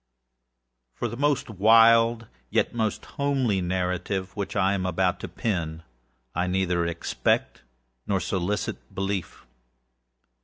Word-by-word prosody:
For 120 - -2
the 120 - -6
most 145 +2 +1
wild, 115 +2 +5 0.2
yet - - +1
most 110 -2 -1
homely 135 -9 0
narrative 90 +1 -2
which 100 -2 -4
I 100 -1 +3
am 95 -2 -1
about 90 0 0
to - - -5
pen, 80 -6 -3 0.5
I 90 +2 0
neither 90 -2 +1
expect 85 0 -1 0.5
nor 100 -2 +1
solicit 95 +2 -2 0.2
belief. 95 -6 -3
95 Hz, 115 wpm, -26 LUFS, 90-115 Hz, 0.5 s, wild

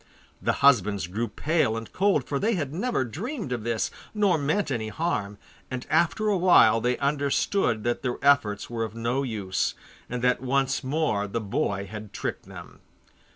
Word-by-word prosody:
The - - +1
husbands 105 -8 +4
grew 105 +7 -3
pale 135 0 0
and 115 -1 -8
cold, 195 -7 +2
for 140 +1 -2
they 220 +6 +1
had 145 -5 -3
never 215 - 0
dreamed 200 - -5
of 120 -3 -2
this, 115 -1 -1 0.2
nor 205 -4 +3
meant 155 +4 0
any 115 -4 -2
harm, 105 -7 -2 0.3
and 130 -1 -5
after 170 +7 +2
a 205 -2 +3
while 115 -11 +6
they 125 +1 +1
understood 140 - 0
that 120 0 -1
their 125 -1 -2
efforts 110 -8 +3
were 115 -1 -3
of 110 0 -5
no 120 +4 -1
use, 105 -8 -2 0.3
and 125 0 -4
that 125 -1 +2
once 135 +1 0
more 130 -7 0
the 115 +4 -2
boy 100 -2 -2
had 105 +1 -9
tricked - - -4
them. - - -11
125 Hz, 175 wpm, -26 LUFS, 110-155 Hz, 0.3 s, while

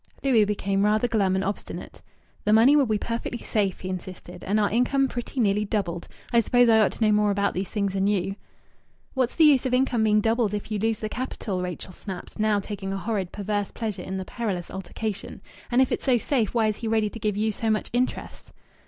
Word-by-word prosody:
Louis 240 -6 +4
became 200 -1 0
rather 215 +3 +3
glum 200 -5 +1
and 190 - 0
obstinate. 200 +1 -5 0.4
"The 210 - +3
money 235 +6 +6
will 285 -4 +4
be 215 -1 +1
perfectly 230 +3 -3
safe," 205 -5 -1
he 185 - -5
insisted, 185 0 -7
"and 210 +3 +1
our 205 - +2
income 270 +4 +2
pretty 245 +1 -5
nearly 210 -2 +2
doubled. 190 -5 -2 0.3
I 235 - +6
suppose 245 +1 +4
I 220 -1 +6
ought 215 - +3
to 225 - 0
know 215 - +4
more 210 0 +3
about 200 0 +1
these 185 +1 -3
things 200 -3 -1
than 195 0 +1
you." 195 -1 0 0.8
"What's 260 -2 0
the 325 - +4
use 280 -4 +5
of 250 - +1
income 250 -3 +2
being 215 -1 +4
doubled 225 -1 +1
if 205 +1 -6
you 210 - -1
lose 225 +1 +1
the 215 - -4
capital?" 215 -5 -4
Rachel 180 +1 -5
snapped, 190 +2 -8
now 215 -1 +2
taking 195 -1 -5
a 195 - -2
horrid, 195 -3 -2
perverse 205 0 -2
pleasure 215 -5 -4
in 190 +1 -5
the 190 - -4
perilous 195 -6 -4
altercation. 195 +2 -5 0.3
"And 255 +2 +4
if 260 - -3
it's - - -2
so 255 -3 +4
safe 235 -3 0
why 225 -2 +3
is 215 -1 0
he 230 - -4
ready 220 -2 +1
to 230 - -8
give 210 -2 -1
you 215 +1 +1
so 220 +2 -2
much 215 -1 0
interest?" 250 +1 -2
215 Hz, 225 wpm, -25 LUFS, 195-230 Hz, 0.8 s, money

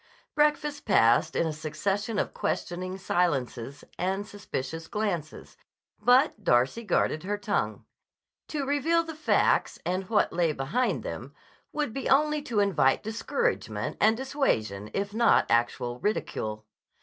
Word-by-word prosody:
Breakfast 295 -1 +1
passed 120 - +4
in - - +2
a 160 - -1
succession 195 +8 -2
of - - -1
questioning 185 +2 -3
silences 140 -8 -1 0.2
and 190 +3 -1
suspicious 165 -6 -5
glances, 185 -8 -4 0.4
but 250 -3 +4
Darcy 130 - +2
guarded 175 -6 +1
her 205 +3 -2
tongue. 205 - -2 0.6
To 290 -3 -3
reveal 300 +4 +2
the 325 -1 -7
facts 310 0 +2
and 185 +1 -2
what 220 - +2
lay 170 -2 +2
behind 150 - -1
them - - -7 0.4
would 295 -7 -2
be 270 - -3
only 300 +2 +3
to 230 -7 0
invite 160 -10 +2
discouragement 230 - -2
and 220 +1 +5
dissuasion 110 - -1
if 200 +1 -2
not 230 +1 +4
actual 120 +1 +1
ridicule. 110 - -2
200 Hz, 130 wpm, -28 LUFS, 155-255 Hz, 0.6 s, and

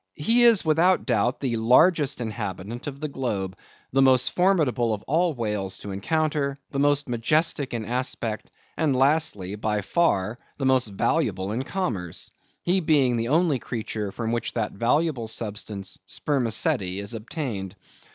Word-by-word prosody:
He 225 +11 +2
is, 230 -7 +6
without 165 +4 +3
doubt, 120 +4 +1
the 125 -4 -1
largest 140 +4 +4
inhabitant 105 +1 -5
of 140 -1 -6
the 155 - -2
globe; 105 -9 -3 0.4
the 135 - +4
most 130 -2 +4
formidable 150 - +2
of 105 - -12
all 165 +1 +1
whales 105 -5 -3
to 100 - -6
encounter; 145 +6 -1
the 140 - -2
most 145 0 +2
majestic 145 +4 +1
in 115 -2 -3
aspect; 120 -2 -3 0.3
and 150 -4 +1
lastly, 130 - +1
by 105 0 -1
far 110 - +1 0.2
the 135 - -2
most 130 -2 +3
valuable 100 - 0
in 115 +4 -1
commerce; 120 - -3 0.3
he 180 +2 +2
being 145 -7 +3
the 115 0 -1
only 155 -1 +2
creature 110 -3 -4
from 115 +2 -3
which 120 -1 -2
that 110 -3 -1
valuable 125 +2 0
substance, 105 -3 -4
spermaceti, 115 -8 0
is 100 +2 -5
obtained. 110 - -5
125 Hz, 150 wpm, -25 LUFS, 105-150 Hz, 0.4 s, is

